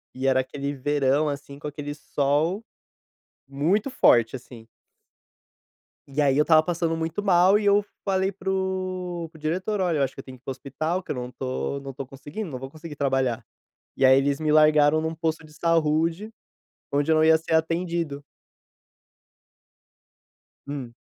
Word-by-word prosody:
e 130 +1 -4
era 130 -1 +4
aquele 140 +2 -3
verão, 145 +1 +1
assim, 140 0 -7
com 150 - -6
aquele 145 0 -5
sol 150 +7 0 0.9
muito 180 - 0
forte, 120 - +4
assim. 120 -2 -13 1.4
E 145 +2 -1
aí, 140 -1 +3
eu 150 - +5
estava 155 -1 +5
passando 165 -1 -1
muito 165 +4 -3
mal, 190 +1 +5
e 205 - -3
eu 200 0 +4 0.2
falei 190 0 +1
para 195 0 -5
o 185 -2 -2
para 160 - -16
o - - -18
diretor, 185 +6 -1
"Olha 170 -4 +1
eu 140 - +2
acho 135 - -2
que, 135 - -8
eu - - -22
tenho 130 -1 -11
que - - -31
ir - - -67
para 135 - -3
o - - -3
hospital, 155 +7 -3
que - - -6
eu - - -2
não 125 0 -5
tô 130 +2 -3
não 135 -1 -7
tô 135 +1 -6
conseguindo, 145 +8 -7
não 130 - -5
vou 135 +1 -8
conseguir 155 -1 -9
trabalhar." 135 -4 0 0.5
E - - +1
aí, 130 +1 +7
eles 140 +1 +1
me 155 -1 0
largaram 155 0 +5
num 160 +1 -2
posto 160 -1 -3
de 150 - -18
saúde, 165 +5 +1 0.6
onde 145 +3 +2
eu - - +5
não 155 - +4
ia 160 0 +6
ser 160 0 -3
atendido. 165 -3 -1 2.4
Hum. 135 -5 -6
155 Hz, 180 wpm, -25 LUFS, 140-170 Hz, 2.4 s, aí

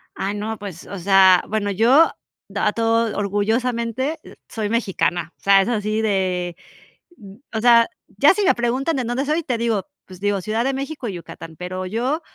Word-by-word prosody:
Ah 195 +1 -2
no, 215 +2 -4
pues, 190 -4 -9
o 200 - -7
sea, 190 0 +5
bueno, 205 -1 -1
yo, 245 - +5 0.4
d - - -5
ah, - - +2
a - - +1
todo 230 -1 +1
orgullosamente, 230 +7 -1
eh, - - -14
soy 215 -2 -3
mexicana. 185 -7 -1
O - - -52
sea, 195 0 +5
es 195 - -1
así 215 -1 -1
de 185 -4 -1 1.0
o 220 - -2
sea, 235 -1 +6 0.3
ya 285 - +6
si 415 - -1
me 385 - +4
preguntan 255 +7 0
de 260 - -1
dónde 245 +4 -2
soy, 310 +3 0
te 255 -6 -2
digo, 225 -4 -1 0.2
pues 185 -1 -13
digo: 200 0 0
"Ciudad 220 +4 -1
de 270 +2 0
México 275 -1 -5
y 200 - -4
Yucatán". 165 -2 -10
Pero, 185 +1 -5
yo 245 - -1
220 Hz, 195 wpm, -21 LUFS, 195-245 Hz, 1.0 s, sea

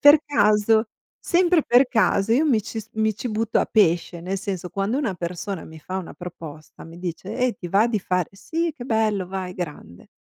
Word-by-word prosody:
per 290 +2 +8
caso, 220 -4 +3 0.3
sempre 350 -2 +3
per 250 +2 +5
caso. 220 -3 +2
Io 275 +7 +4
mi 255 -8 +3
ci 220 +2 -5
s - - -14
mi 220 -1 +1
ci 240 +3 -5
butto 220 +1 0
a - - +1
pesce, 175 -4 +2
nel 190 +3 -3
senso 185 -2 -4
quando 200 +6 -1
una 230 -10 -1
persona 175 +1 -5
mi 160 0 -11
fa 185 +5 -5
una 185 - -8
proposta, 165 -4 -10
mi 165 +1 -11
dice: 180 +4 -5
"Eh, 250 -1 +1
ti 175 - -7
va 200 +6 +4
di 230 -3 0
fa" 180 -1 0
,"Sì, 330 +12 -2
che 245 - -7
bello, 220 -5 +1
vai, 185 -1 -5
grande." 150 - -7
205 Hz, 205 wpm, -23 LUFS, 180-230 Hz, 0.3 s, per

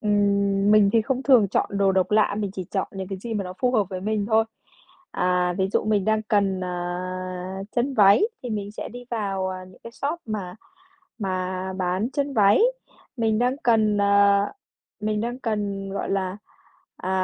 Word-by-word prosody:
Ừm, 200 -1 +2
mình 210 -2 +6
thì 225 - +4
không 260 +3 -2
thường 250 -7 +5
chọn - - 0
đồ 195 -1 +3
độc 190 0 +1
lạ, 210 -1 +3
mình 205 -2 -2
chỉ 185 -2 -5
chọn 195 - -1
những 190 -1 -6
cái 195 -1 -5
gì 225 +4 -5
mà 205 -2 -1
nó 180 - -6
phù 250 - +2
hợp 215 -5 +3
với 185 -2 -5
mình 210 +1 -1
thôi. 220 0 +3 0.7
À, 180 0 +1
ví 190 0 +1
dụ - - +1
mình 210 -2 +1
đang 220 +1 +1
cần, 200 -3 +1
à, 185 +1 -4
chân 260 +3 0
váy 200 - +6 0.2
thì 245 - -5
mình 205 -2 -3
sẽ - - -6
đi 245 0 -10
vào, 195 -4 -2
à, 185 0 -6
những 185 0 -17
cái 230 - -7
shop 285 +7 -3
mà 200 -5 -4 0.6
mà 185 -2 -3
bán 185 +6 -1
chân 280 0 -2
váy. 205 - +5 0.6
Mình 220 -2 +1
đang 250 +3 +1
cần, 215 -3 +3
à, 200 0 +4 0.5
mình 210 0 -1
đang 240 +2 -3
cần, 205 -4 -2
gọi 195 - -3
là, 190 -1 -1 0.6
à, 185 - -5
200 Hz, 190 wpm, -24 LUFS, 190-220 Hz, 0.7 s, mình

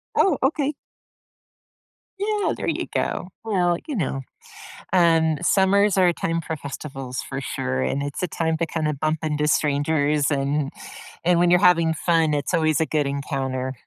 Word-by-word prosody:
Oh, 355 -8 +3
okay. 290 +1 +1 1.5
Yeah. 415 0 0
There - - -5
you - - -1
go. 180 - -2 0.2
Well, 175 -5 +1
you 290 - -3
know, 135 -7 -2 0.7
And 165 -2 +3
summers 200 +1 +3
are 180 -1 +5
a 170 - +1
time 165 0 -1
for 160 0 -4
festivals 135 -2 -6
for 135 0 -4
sure, 65 - -2
and 140 - -1
it's 145 +5 -5
a 180 - 0
time 160 0 -1
to 165 - 0
kinda 155 -2 -1
bump 155 +2 -1
into 150 -1 0
strangers. 145 0 +1
And 140 0 0 0.5
and 175 -1 +3
when 175 0 +4
you're 180 - +6
having 170 -3 +4
fun, 165 -1 +2
it's 145 +5 -2
always 155 -1 +2
a 160 - +2
good 150 -2 0
encounter. 135 -2 -3
160 Hz, 165 wpm, -23 LUFS, 140-175 Hz, 1.5 s, you're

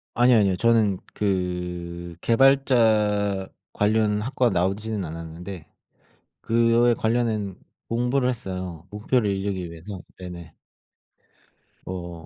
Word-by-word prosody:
아니요 120 -1 +5
아니요. 100 -3 +3
저는 110 -5 +3 0.2
그 90 -3 -3
개발자 110 -6 +3 0.3
관련 105 0 +2
학과 125 0 +1
나오지는 100 +3 -1
않았는데 85 +2 -7 0.7
그거에 115 +1 +3
관련한 110 -4 -1 0.3
공부를 125 +2 +1
했어요, 95 -7 -5
목표를 105 +1 0
이루기 95 -2 -2
위해서. 90 +3 -8 0.2
네네. 85 -3 -9 1.3
어. 85 -3 -7
100 Hz, 235 characters per minute, -24 LUFS, 90-115 Hz, 1.3 s, 아니요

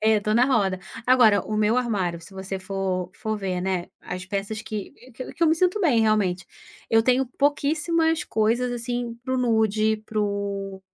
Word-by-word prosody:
é, 220 0 +4
estou 215 +1 0
na 245 +2 +5
roda. 200 -8 +1 0.3
Agora, 230 -6 +5
o 215 - -3
meu 215 +3 +2
armário, 195 -9 -1
se 185 +4 -14
você 190 0 -5
for 185 -1 -3
for 220 0 -3
ver, 185 -3 -3
né, 185 -2 -2
as 180 +1 -6
peças 200 +2 -4
que 215 -6 -6 0.2
que 255 - -7
que 335 - -4
eu - - +6
me 320 - +4
sinto 365 +5 +1
bem, 280 - +3
realmente, 205 -5 +1 0.4
eu 225 0 +5
tenho 255 +2 +2
pouquíssimas 310 +3 +1
coisas, 230 +3 +1
assim, 240 0 -3
para 260 -1 -1
o - - 0
nude, 220 -2 +2
para 215 -1 -2
o 200 -1 -3
215 Hz, 185 wpm, -24 LUFS, 195-250 Hz, 0.4 s, eu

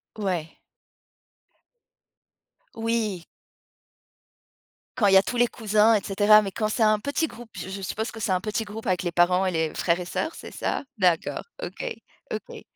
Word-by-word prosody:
Ouais. 180 -6 -3 2.2
Oui. 225 -5 -1 1.7
Quand 215 -5 +4
il 195 - +4
y - - +9
a 190 - +6
tous 245 - -3
les 240 0 +4
cousins 215 0 +3
et 205 - 0
cetera, 210 +2 +5
mais 195 -2 -4
quand 215 +3 -1
c'est 220 +1 +1
un 215 -1 +4
petit 285 +7 -1
groupe, 240 -4 -12
je - - -6
je 195 +1 -6
suppose 220 +4 -3
que 225 - -9
c'est 205 - -1
un 185 -1 +1
petit 215 +2 -2
groupe 220 +2 -7
avec 185 -2 +1
les 175 - -1
parents 180 +2 +3
et 185 - +1
les 160 -2 -1
frères 170 0 +1
et 180 - -4
sœurs, 320 - -2
c'est - - -10
ça? - - -2
D'accord, 180 -5 +1 0.2
OK, - - -6 0.5
OK. - - -6
205 Hz, 180 wpm, -25 LUFS, 185-225 Hz, 2.2 s, y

